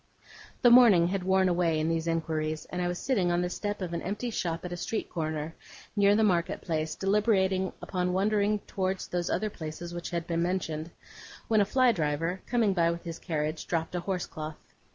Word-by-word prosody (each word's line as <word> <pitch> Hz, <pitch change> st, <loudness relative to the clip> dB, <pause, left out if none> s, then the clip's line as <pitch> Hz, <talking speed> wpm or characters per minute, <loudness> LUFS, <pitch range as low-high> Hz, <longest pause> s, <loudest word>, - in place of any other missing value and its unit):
The 245 Hz, -, +7 dB
morning 215 Hz, -9 st, +7 dB
had 195 Hz, 0 st, -1 dB
worn 190 Hz, 0 st, +3 dB
away 170 Hz, -3 st, +2 dB
in 155 Hz, -, 0 dB
these 165 Hz, 0 st, -1 dB
inquiries, 155 Hz, -1 st, -1 dB
and 180 Hz, -, -2 dB
I 175 Hz, -, 0 dB
was 175 Hz, 0 st, -2 dB
sitting 195 Hz, -9 st, +1 dB
on 175 Hz, 0 st, +1 dB
the 180 Hz, -, -2 dB
step 205 Hz, 0 st, -3 dB
of 175 Hz, -2 st, -4 dB
an 170 Hz, -, -2 dB
empty 210 Hz, +6 st, -3 dB
shop 170 Hz, -5 st, -2 dB
at 175 Hz, -, -4 dB
a -, -, -3 dB
street 180 Hz, +6 st, -3 dB
corner, 155 Hz, -1 st, -3 dB, 0.4 s
near 200 Hz, 0 st, +5 dB
the 220 Hz, -, +3 dB
market 175 Hz, -5 st, +1 dB
place, 155 Hz, -1 st, -2 dB
deliberating 195 Hz, -2 st, +2 dB
upon 180 Hz, -1 st, -1 dB
wandering 205 Hz, +2 st, +1 dB
towards 190 Hz, 0 st, -2 dB
those 175 Hz, -1 st, -2 dB
other 210 Hz, +2 st, -1 dB
places 170 Hz, +1 st, -7 dB
which 175 Hz, 0 st, -5 dB
had 170 Hz, -2 st, -3 dB
been 170 Hz, -1 st, -1 dB
mentioned, 170 Hz, -3 st, -2 dB, 0.6 s
when 220 Hz, -2 st, +4 dB
a -, -, +3 dB
fly 255 Hz, +4 st, +4 dB
driver, 165 Hz, 0 st, -1 dB
coming 230 Hz, -5 st, +2 dB
by 170 Hz, -2 st, +3 dB
with 170 Hz, 0 st, -3 dB
his 165 Hz, -2 st, -6 dB
carriage, 155 Hz, -2 st, -3 dB
dropped 165 Hz, -1 st, -1 dB
a 180 Hz, -, -1 dB
horsecloth. 165 Hz, -4 st, -5 dB
180 Hz, 200 wpm, -29 LUFS, 165-195 Hz, 0.6 s, The